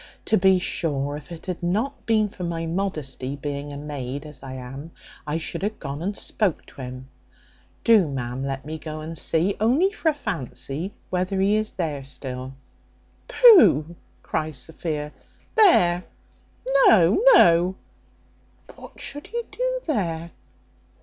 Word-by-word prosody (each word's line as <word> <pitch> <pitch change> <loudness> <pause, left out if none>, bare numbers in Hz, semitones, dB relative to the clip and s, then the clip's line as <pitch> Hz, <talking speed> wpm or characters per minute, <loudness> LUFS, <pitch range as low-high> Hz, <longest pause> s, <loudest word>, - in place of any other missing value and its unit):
To - - +3
be 190 -1 +5
sure, 145 -5 -2
if 150 +3 -10
it 170 - -9
had 185 -2 -4
not 215 +11 -2
been 215 -2 +3
for 195 -2 -9
my 165 -1 -3
modesty, 155 -7 -3
being 145 0 -5
a 140 - -7
maid, 140 -1 -5
as 150 -1 -11
I 135 -1 -8
am, 130 +4 -8 0.4
I 150 +2 -1
should 165 - -4
have 210 +2 -2
gone 140 0 -6
and 200 +3 -3
spoke 200 -7 -1
to - - -12
him. 130 0 -8 0.8
Do, 220 -7 +5
ma'am, 130 -2 -4
let 135 0 -4
me 155 +1 -6
go 155 0 -6
and 160 +2 -6
see, 165 +4 +1
only 270 - +3
for 340 -5 0
a 305 - -1
fancy, 175 - -4 0.2
whether 185 +1 -1
he 200 +2 +3
is 215 0 -1
there 150 -6 -3
still." 130 -1 -6 0.7
"Pugh!" 175 - +6 0.4
says 155 -2 -1
Sophia. 150 +1 -5 0.4
"There! 180 - +5 0.8
no, 190 - +5
no: 175 - +5 1.0
what - - -13
should 290 +1 -6
he 475 +2 -3
do - - -1
there? 170 - -2
165 Hz, 150 wpm, -24 LUFS, 140-200 Hz, 1.0 s, Pugh